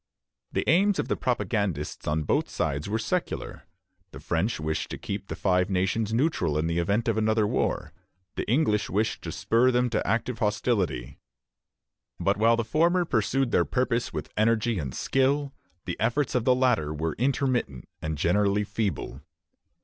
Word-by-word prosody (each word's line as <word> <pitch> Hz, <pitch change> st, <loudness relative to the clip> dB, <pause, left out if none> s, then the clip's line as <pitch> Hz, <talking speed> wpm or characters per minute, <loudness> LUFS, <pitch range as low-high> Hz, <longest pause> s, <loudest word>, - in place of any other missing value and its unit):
" -, -, -62 dB
The -, -, -1 dB
aims 195 Hz, +5 st, +4 dB
of -, -, -2 dB
the -, -, +1 dB
propagandists 100 Hz, -, -2 dB
on 75 Hz, +1 st, 0 dB
both -, -, 0 dB
sides 70 Hz, +6 st, -2 dB
were 110 Hz, -, 0 dB
secular. 165 Hz, +11 st, -3 dB, 0.4 s
The -, -, -10 dB
French 85 Hz, +6 st, -1 dB
wished 80 Hz, 0 st, -2 dB
to -, -, -5 dB
keep 100 Hz, 0 st, -5 dB
the -, -, -4 dB
Five 90 Hz, 0 st, +1 dB
Nations 100 Hz, +4 st, 0 dB
neutral 115 Hz, -, +1 dB
in 80 Hz, -, 0 dB
the 85 Hz, +1 st, 0 dB
event 100 Hz, +7 st, 0 dB
of 110 Hz, -1 st, +1 dB
another 110 Hz, 0 st, +2 dB
war; -, -, -1 dB, 0.4 s
the -, -, -3 dB
English 115 Hz, -5 st, +2 dB
wished 105 Hz, +3 st, 0 dB
to -, -, -5 dB
spur 120 Hz, +3 st, +2 dB
them 125 Hz, -1 st, +1 dB
to 110 Hz, -, -1 dB
active 115 Hz, +3 st, -1 dB
hostility; 105 Hz, -, -1 dB, 1.0 s
but 100 Hz, -, +2 dB
while 115 Hz, +2 st, +4 dB
the 115 Hz, -, 0 dB
former 170 Hz, +8 st, +2 dB
pursued 130 Hz, -1 st, 0 dB
their -, -, +4 dB
purpose 125 Hz, -2 st, -1 dB
with -, -, -6 dB
energy 110 Hz, -1 st, +2 dB
and 70 Hz, -5 st, -5 dB
skill, 140 Hz, +1 st, +1 dB, 0.3 s
the -, -, -4 dB
efforts 120 Hz, +5 st, 0 dB
of 125 Hz, -2 st, 0 dB
the 125 Hz, -, +5 dB
latter 125 Hz, -, +2 dB
were 80 Hz, +1 st, -2 dB
intermittent 130 Hz, -, 0 dB
and 80 Hz, -1 st, -3 dB
generally 100 Hz, +6 st, +2 dB
feeble. 105 Hz, -, -3 dB
110 Hz, 170 wpm, -27 LUFS, 90-125 Hz, 1.0 s, the